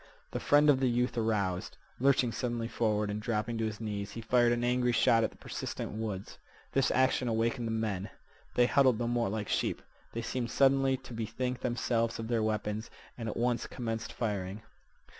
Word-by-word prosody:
The - - -2
friend 145 +1 +4
of 130 - +2
the 130 -1 +2
youth 125 +1 +1
aroused. 100 -6 -1 0.2
Lurching 130 -2 +3
suddenly 120 -1 -2
forward 105 -3 0
and 105 +1 -3
dropping 115 0 -1
to 110 - +1
his 105 -1 -5
knees, 105 -3 -3
he 115 - -5
fired 120 +1 +3
an 120 0 0
angry 125 0 +2
shot 115 0 +4
at 110 - +1
the - - -19
persistent - - -5
woods. 105 -3 -5 0.3
This 135 -1 +2
action 130 -1 +2
awakened 115 +2 0
the - - -2
men. 110 -3 -2 0.5
They 120 - +5
huddled 130 -2 +4
no 120 0 -1
more 120 -2 +1
like 105 0 -3
sheep. - - 0 0.3
They 115 - -3
seemed 120 0 -2
suddenly 135 0 +3
to 125 - -11
bethink 115 +3 -3
themselves 115 -1 0
of 115 0 -5
their 115 -2 +2
weapons, 110 0 -1 0.3
and 115 -2 -4
at - - -4
once 120 0 0
commenced 115 -2 -4
firing. 105 -2 -3
115 Hz, 190 wpm, -31 LUFS, 110-125 Hz, 0.5 s, They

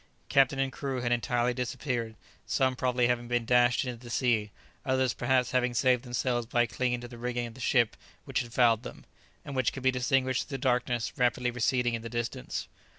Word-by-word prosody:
Captain 135 0 +4
and 135 -1 0
crew 135 -2 -3
had 120 0 -1
entirely 120 +1 +1
disappeared, 120 -2 -3 0.3
some 130 +2 +1
probably 125 -1 +1
having 120 0 0
been 120 -1 0
dashed 120 +1 +3
into 120 -2 -5
the 120 - -9
sea, 115 -4 +1 0.3
others 130 -2 +1
perhaps 125 0 +1
having 125 -1 +1
saved 125 0 +3
themselves 120 -1 -1
by 120 +1 +2
clinging 120 +2 -1
to 120 - -7
the 120 -1 -11
rigging 120 0 -2
of 115 - -8
the 130 - -12
ship 120 -2 +2 0.3
which - - -1
had 120 -2 -5
fouled 115 -2 +4
them, - - -10 0.4
and 140 -2 -6
which 130 -3 +2
could 135 - -8
be 130 - +4
distinguished 130 +1 0
through 135 - -3
the - - -14
darkness 125 -2 0
rapidly 125 0 +2
receding 125 0 +1
in 115 - -2
the 115 - -6
distance. 120 - -4
125 Hz, 205 wpm, -29 LUFS, 120-130 Hz, 0.4 s, Captain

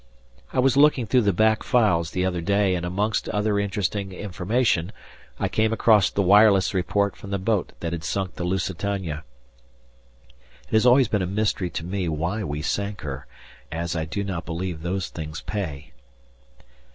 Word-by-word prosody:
I - - -6
was 130 0 +3
looking 140 -3 +4
through 125 +3 +3
the 105 -3 +2
back 110 +4 +2
files 100 -10 +2
the 90 0 -1
other 90 -2 -1
day 100 +1 +2
and 90 -1 -2
amongst 105 +5 -1
other 105 0 0
interesting 100 -1 -2
information 95 0 0 0.5
I - - +1
came 110 0 +1
across 110 -3 +4
the 100 - 0
wireless 100 0 +5
report 100 +2 0
from 100 - -11
the 100 - -1
boat 100 0 -1
that 85 -1 -3
had 85 -2 -4
sunk 95 +2 -2
the 90 - -5
Lusitania. 90 -3 -2 1.4
It - - -25
has 110 +3 +4
always 125 0 +6
been 105 -2 0
a 90 - -1
mystery 100 -2 -1
to 80 0 -5
me 90 -1 -2
why 85 +8 -2
we 75 -3 -4
sank 100 +4 -2
her, 70 -2 -6 0.4
as 85 +1 -3
I 80 -1 -1
do 90 +6 -3
not 95 -4 -4
believe 85 -1 -4
those 90 +2 -2
things 75 -1 -6
pay. 75 - -5
95 Hz, 175 wpm, -24 LUFS, 85-105 Hz, 1.4 s, always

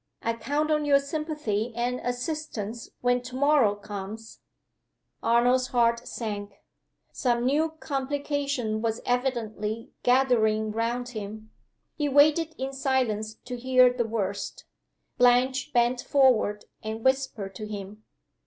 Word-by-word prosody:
I 230 - +1
count 290 +6 -1
on 300 -1 +2
your 285 -1 +5
sympathy 280 -7 -2
and 245 +1 -1
assistance 245 -4 -4
when 245 0 +2
to 250 +1 -9
morrow 275 -6 +4
comes!" 205 +2 -8 0.8
Arnold's 245 +2 +3
heart 235 -1 +1
sank. 205 -3 -5 0.6
Some 240 -2 0
new 310 +4 +2
complication 280 -5 -2
was 225 0 -1
evidently 230 -3 -2
gathering 225 -4 +3
round 235 +3 -2
him. 215 -1 -7 0.4
He 295 -2 -1
waited 305 +3 +4
in 265 +1 -4
silence 245 -6 0
to 250 - -5
hear 255 0 +5
the 240 -2 -1
worst. 200 -3 -3 0.5
Blanche 255 +3 +3
bent 240 0 +2
forward, 250 -7 +3 0.2
and 220 +1 -5
whispered 260 -7 0
to 215 +1 -6
him. 210 0 -8
245 Hz, 120 wpm, -27 LUFS, 220-270 Hz, 0.8 s, your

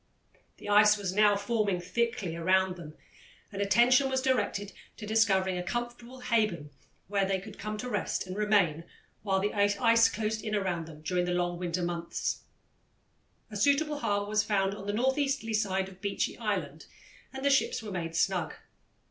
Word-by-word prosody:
The - - -11
ice 210 +1 +6
was 195 -3 -3
now 210 0 +5
forming 205 -2 0
thickly 190 -1 -2
around 185 +2 +2
them, 155 -3 -10 0.6
and 200 -1 -4
attention 245 +6 +4
was 265 0 +1
directed 250 -6 -1 0.2
to 210 - -7
discovering 195 -4 +2
a - - -3
comfortable 240 +5 -5
haven 215 -11 0 0.4
where 200 +1 +1
they 190 0 0
could 200 +2 -11
come 215 0 -4
to 250 - -5
rest 205 -5 -2
and 185 0 -6
remain 200 -7 +2 0.4
while 195 -2 0
the 205 +2 -1
ice 215 +3 +4
closed 220 0 -2
in 215 -1 -2
around 180 -5 -2
them 155 -1 -12
during 180 +2 0
the 180 0 -1
long 175 0 -1
winter 180 0 -2
months. 170 -1 -3 1.1
A - - -8
suitable 285 +6 +2
harbour 205 -5 0
was 210 +1 +1
found 195 -2 0
on 200 0 -8
the 205 - -1
northeasterly 265 0 0
side 190 -3 0
of 190 -1 -14
Beechy 200 -1 -2
Island - - -3 0.4
and 265 +1 -6
the 280 - +4
ships 270 -3 +1
were 210 - -6
made 165 -3 -4
snug. 180 -1 0
205 Hz, 175 wpm, -29 LUFS, 185-225 Hz, 1.1 s, ice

